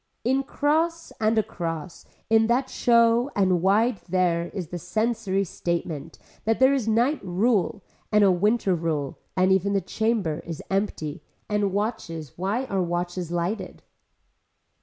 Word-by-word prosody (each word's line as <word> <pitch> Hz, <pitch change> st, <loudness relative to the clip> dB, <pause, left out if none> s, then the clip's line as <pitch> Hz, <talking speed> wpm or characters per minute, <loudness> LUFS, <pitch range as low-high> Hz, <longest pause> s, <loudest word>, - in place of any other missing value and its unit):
In 265 Hz, +3 st, +2 dB
cross 320 Hz, +4 st, 0 dB
and 220 Hz, +1 st, +2 dB
across, 170 Hz, -5 st, -3 dB, 0.2 s
in 225 Hz, 0 st, +4 dB
that 255 Hz, +3 st, +1 dB
show 235 Hz, +1 st, +4 dB
and 185 Hz, -3 st, +2 dB
wide 210 Hz, +5 st, +3 dB
there 175 Hz, -2 st, +1 dB
is 180 Hz, -4 st, -6 dB
the 175 Hz, -, -5 dB
sensory 200 Hz, +1 st, 0 dB
statement 165 Hz, -4 st, -4 dB, 0.3 s
that 225 Hz, 0 st, +1 dB
there 260 Hz, +1 st, +6 dB
is 260 Hz, -5 st, -1 dB
night 240 Hz, +7 st, +2 dB
rule 195 Hz, +1 st, +1 dB, 0.3 s
and 210 Hz, -1 st, +5 dB
a 195 Hz, -, +6 dB
winter 205 Hz, +2 st, +2 dB
rule 160 Hz, -5 st, -2 dB, 0.2 s
and 185 Hz, +1 st, +4 dB
even 190 Hz, +1 st, +2 dB
the 200 Hz, -, +3 dB
chamber 195 Hz, -4 st, -1 dB
is 165 Hz, -2 st, -7 dB
empty 185 Hz, -6 st, -2 dB, 0.3 s
and 210 Hz, -2 st, 0 dB
watches 185 Hz, -, -3 dB
why 200 Hz, +9 st, -1 dB
are 195 Hz, -6 st, -1 dB
watches 175 Hz, 0 st, -2 dB
lighted. 175 Hz, +5 st, -3 dB
195 Hz, 140 wpm, -25 LUFS, 175-230 Hz, 0.3 s, there